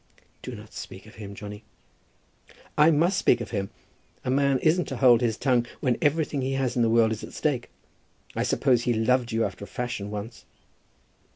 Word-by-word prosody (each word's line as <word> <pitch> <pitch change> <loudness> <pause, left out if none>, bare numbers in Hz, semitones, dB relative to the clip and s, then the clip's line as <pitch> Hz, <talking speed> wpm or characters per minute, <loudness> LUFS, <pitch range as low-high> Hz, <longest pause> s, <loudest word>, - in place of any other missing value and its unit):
"Do - - -6
not - - -12
speak 95 +1 -8
of 110 - -14
him, 100 -1 -8
Johnny." 105 +1 -8 1.1
"I 150 +2 +6
must 170 +5 +3
speak - - +3
of 115 -3 -6
him. 100 -3 -2 0.6
A 125 - 0
man 140 0 +3
isn't 170 +3 +3
to 135 - -5
hold 120 -3 +6
his 115 -3 0
tongue 125 -3 +2
when 125 -5 0
everything 150 -1 +1
he 130 +1 -1
has 135 -2 -1
in 120 - +2
the 115 - +3
world 115 -1 +4
is 110 - -4
at - - -9
stake. - - -1 0.7
I - - 0
suppose 125 -4 +2
he 120 0 0
loved 120 +2 +2
you 115 0 +1
after - - -6
a - - -8
fashion, 105 -2 -4
once." 105 +3 -7
120 Hz, 195 wpm, -26 LUFS, 110-135 Hz, 1.1 s, I